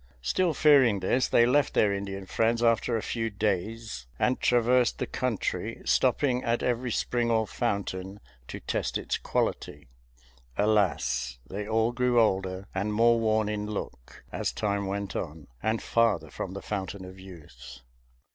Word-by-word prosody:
Still 170 - +1
fearing 135 -9 +5
this, 125 +7 +2
they 120 - +5
left 140 +3 +2
their 105 -2 +4
Indian 100 -1 -5
friends 115 +4 +1
after 115 0 +2
a 110 - -4
few 115 -1 -2
days 105 - -3
and 125 - +1
traversed 125 0 +3
the - - -2
country, 125 -5 -2
stopping 130 -3 +2
at 115 0 0
every 125 0 0
spring 120 +1 0
or 110 -1 +2
fountain 100 -3 -3 0.3
to - - -7
test - - -2
its - - -3
quality. - - -2 0.7
Alas! 90 - +1
they 100 +5 -5
all 110 +1 +2
grew 125 -1 +2
older 95 -3 0
and 100 +2 -1
more 115 +1 +4
worn 110 -1 +1
in 105 -1 -3
look, 80 - -7
as - - -2
time 100 -2 -1
went 100 0 -4
on, 80 -3 -5 0.2
and 110 0 -1
farther 105 -10 +1
from 95 - -5
the 100 - -7
Fountain 95 -2 -4
of 95 +1 -11
Youth. 70 -9 -12
105 Hz, 155 wpm, -28 LUFS, 95-115 Hz, 0.7 s, fearing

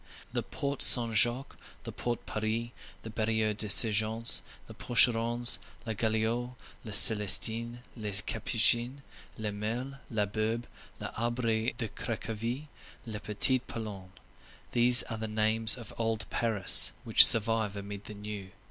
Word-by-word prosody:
The - - -3
Porte 140 0 -7
Saint 115 -3 +7
Jacques, 120 +5 -1 0.3
the - - -9
Porte 120 -1 -7
Paris, 110 +2 -5 0.3
the 110 - -10
Barrière 110 -1 -3
des 105 0 -3
Sergents, 110 +2 +2 0.2
the - - -14
Porcherons, 120 0 0 0.3
la 110 - -5
Galiote, 115 +3 -4 0.3
les 110 - -10
Célestins, 110 +3 +6 0.2
les 105 -3 -2
Capucins, 120 +4 -1 0.3
le 110 -2 -6
Mail, 120 +7 -7
la 110 -3 -3
Bourbe, 110 +3 -5 0.3
l'Arbre 115 0 -5
de 115 - -5
Cracovie, 115 +5 -7 0.4
la 110 -3 -9
Petite 120 +5 -1
Pologne—these 110 +3 -2
are 115 -2 -9
the 110 - -6
names 110 +2 -1
of 115 -3 -13
old 110 -1 -4
Paris 110 -5 +2
which - - +7
survive 110 -2 +3
amid 100 0 -10
the 105 - -11
new. 105 -2 -10
110 Hz, 130 wpm, -27 LUFS, 105-120 Hz, 0.4 s, Saint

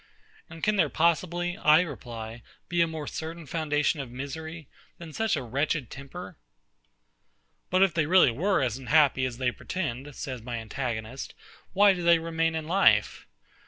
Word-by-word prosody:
And 160 0 -11
can 210 -1 +2
there - - +3
possibly, 175 +2 0
I 155 +2 +6
reply, 120 -8 -7 0.3
be 175 0 +2
a 165 - +4
more 160 -2 -5
certain 160 +3 -6
foundation 150 -1 0
of 135 -3 -5
misery, 155 +5 -7 0.3
than 165 -2 -10
such 220 +1 0
a 140 - -3
wretched 135 +2 -1
temper? 160 +5 -9 1.3
But 185 +1 +4
if 195 - +2
they 155 -3 +1
were - - -6 0.2
really 160 - +1
as 125 +1 -3
unhappy 135 0 +3
as 125 -2 -4
they 125 -1 0
pretend, 145 -4 -5
says 130 -4 -5
my 120 +1 -5
antagonist, 115 +1 -5 0.4
why 200 +1 +6
do 180 - -5
they 170 0 +5
remain 165 0 -1
in 160 -1 -3
life?... 155 - +3
155 Hz, 160 wpm, -27 LUFS, 130-170 Hz, 1.3 s, I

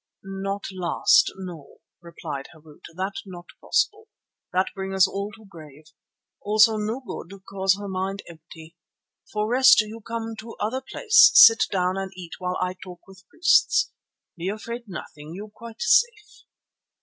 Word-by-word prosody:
"Not 195 +1 -5
last, 400 - +2
no," 175 -7 -10 0.2
replied 155 -5 -7
Harût, 155 -1 -18
"that 190 +2 -3
not 180 -3 -11 0.2
possible. 430 +1 -1 0.4
That 185 +1 0
bring 195 0 -5
us 190 0 +5
all 200 +1 -5
to 220 0 -16
grave. 155 -4 -15 0.5
Also 215 +1 +4
no 215 +5 -3
good, 195 -6 -9
'cause 195 0 +1
her 205 0 -7
mind 190 +1 -4
empty. 165 0 -14 0.6
For 210 0 -1
rest, 260 +3 +6
you 215 +2 -9
come 225 0 -5
to 230 +1 -9
other 235 +5 -3
place, 430 - +5
sit 225 0 +8
down 185 -1 -1
and 195 -1 -4
eat 175 -3 -10
while 180 0 -3
I 180 0 -2
talk 180 -2 -11
with 190 -1 -18
priests. 360 +7 +3 0.4
Be 175 +2 -4
afraid 235 +3 -6
nothing; 155 -3 -9
you 205 +2 -9
quite 230 +1 -9
safe." 430 -1 +1
195 Hz, 150 wpm, -24 LUFS, 180-225 Hz, 0.6 s, sit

